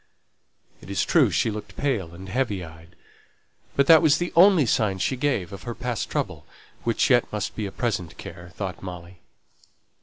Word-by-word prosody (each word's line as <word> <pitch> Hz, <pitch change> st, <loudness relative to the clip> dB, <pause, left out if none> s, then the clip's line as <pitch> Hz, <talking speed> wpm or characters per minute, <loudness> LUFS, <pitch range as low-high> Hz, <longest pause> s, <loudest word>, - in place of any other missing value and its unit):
It -, -, -13 dB
is 100 Hz, -, 0 dB
true -, -, +4 dB
she 110 Hz, -, +1 dB
looked 105 Hz, 0 st, -8 dB
pale 115 Hz, -, -1 dB
and 95 Hz, +2 st, -10 dB
heavy 105 Hz, -4 st, -1 dB
eyed, 80 Hz, +2 st, -15 dB, 0.8 s
but 140 Hz, -, +4 dB
that 160 Hz, +1 st, +8 dB
was 155 Hz, -2 st, +4 dB
the 175 Hz, +1 st, -3 dB
only 175 Hz, -3 st, +6 dB
sign 105 Hz, -4 st, +1 dB
she 130 Hz, -, 0 dB
gave 125 Hz, -, -1 dB
of 100 Hz, -, -8 dB
her 120 Hz, -1 st, -6 dB
past 125 Hz, -5 st, -3 dB
trouble, -, -, -3 dB, 0.4 s
which 115 Hz, +3 st, +1 dB
yet 120 Hz, -1 st, +3 dB
must 105 Hz, -2 st, -3 dB
be 105 Hz, -2 st, -3 dB
a -, -, -7 dB
present 100 Hz, -9 st, -3 dB
care, 85 Hz, +1 st, -10 dB
thought 95 Hz, -5 st, -5 dB
Molly. 90 Hz, -1 st, -9 dB
105 Hz, 180 wpm, -24 LUFS, 90-130 Hz, 0.8 s, that